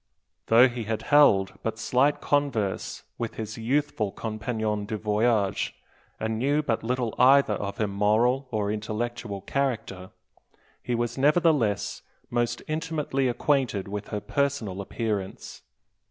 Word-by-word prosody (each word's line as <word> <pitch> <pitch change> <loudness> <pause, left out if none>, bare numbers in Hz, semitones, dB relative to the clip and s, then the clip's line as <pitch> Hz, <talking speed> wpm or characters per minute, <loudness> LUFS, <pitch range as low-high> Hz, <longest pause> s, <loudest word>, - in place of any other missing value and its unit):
Though 120 +3 +7
he 120 -2 -5
had 110 0 -3
held 100 -11 +4
but 110 0 -3
slight 125 +6 +2
converse 135 -9 -1 0.2
with 115 -1 -3
his 110 0 -6
youthful 120 -3 0
compagnon 110 -1 -3
du 110 0 -3
voyage, 105 -1 +1 0.4
and 110 0 -2
knew 145 +4 +1
but 115 -6 0
little 120 -1 -1
either 135 -2 +6
of 100 0 -4
her 110 - 0
moral 110 +7 +2
or 105 -3 -1
intellectual 110 -1 -4
character, 110 -6 -2 0.7
he 120 - -2
was 120 +2 -2
nevertheless 145 - +2 0.3
most 120 -1 -1
intimately 155 -4 -1
acquainted 125 -5 0
with 105 +1 -5
her 105 - -3
personal 110 -4 -1
appearance. 100 -1 -4
115 Hz, 125 wpm, -26 LUFS, 105-130 Hz, 0.7 s, Though